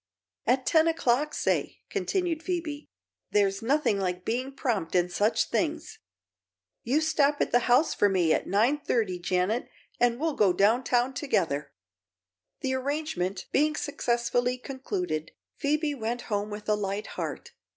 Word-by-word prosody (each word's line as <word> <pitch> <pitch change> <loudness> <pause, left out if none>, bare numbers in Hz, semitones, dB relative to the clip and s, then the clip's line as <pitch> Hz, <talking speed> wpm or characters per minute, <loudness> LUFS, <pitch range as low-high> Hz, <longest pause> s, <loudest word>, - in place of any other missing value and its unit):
"At 255 0 +2
ten 320 0 +4
o'clock, 300 -2 +1
say," - - -1
continued 350 -4 -1
Phoebe. 330 -4 -4 0.4
"There's 200 -1 +2
nothing 250 -4 +2
like 180 -1 -2
being 255 +4 -1
prompt 230 -11 -2
in 180 0 +3
such 205 +5 +2
things. - - -2 0.8
You 275 +7 +1
stop 295 -2 +2
at - - 0
the 245 0 +2
house 255 +7 +4
for 205 - +3
me 180 -4 +3
at - - -1
nine 230 +10 +2
thirty, 215 -10 0
Janet, 185 +6 0 0.3
and 240 0 +2
we'll 320 0 0
go 200 -8 +3
down 215 +7 +3
town 245 +1 +1
together." 165 - -1 0.9
The 265 -1 -1
arrangement 260 - -2
being 300 +2 +2
successfully 245 -2 0
concluded, 185 - -4 0.2
Phoebe 300 +1 0
went 240 -2 -3
home 205 +1 -1
with 210 0 -7
a 210 - +3
light 205 0 -2
heart. - - -5
240 Hz, 145 wpm, -28 LUFS, 200-290 Hz, 0.9 s, ten